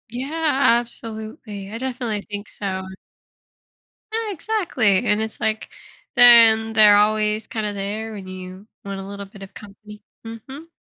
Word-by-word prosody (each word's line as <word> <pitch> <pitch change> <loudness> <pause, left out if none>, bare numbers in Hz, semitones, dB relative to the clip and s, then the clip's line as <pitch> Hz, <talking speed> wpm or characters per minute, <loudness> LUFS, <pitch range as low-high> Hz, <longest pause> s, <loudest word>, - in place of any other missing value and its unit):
Yeah, 275 0 +1
absolutely, 220 -3 -9
I 225 - -6
definitely 240 -4 -3
think 205 0 -6
so. 190 -2 -5 1.3
Ah, 450 -1 -1
exactly, 330 - 0
and 210 +1 +1
it's 220 0 -5
like 220 0 -2 0.5
then 230 -3 +7
they're 210 -2 +6
always 215 +1 +1
kinda 215 -2 -3
there 205 +3 -5
when 195 -3 -9
you 185 +2 -10 0.2
want 195 -1 -6
a 195 - -8
little 200 0 -8
bit 195 0 -16
of 195 - -13
company, 210 0 -14 0.2
mhm. 265 +8 -10
215 Hz, 140 wpm, -21 LUFS, 205-235 Hz, 1.3 s, then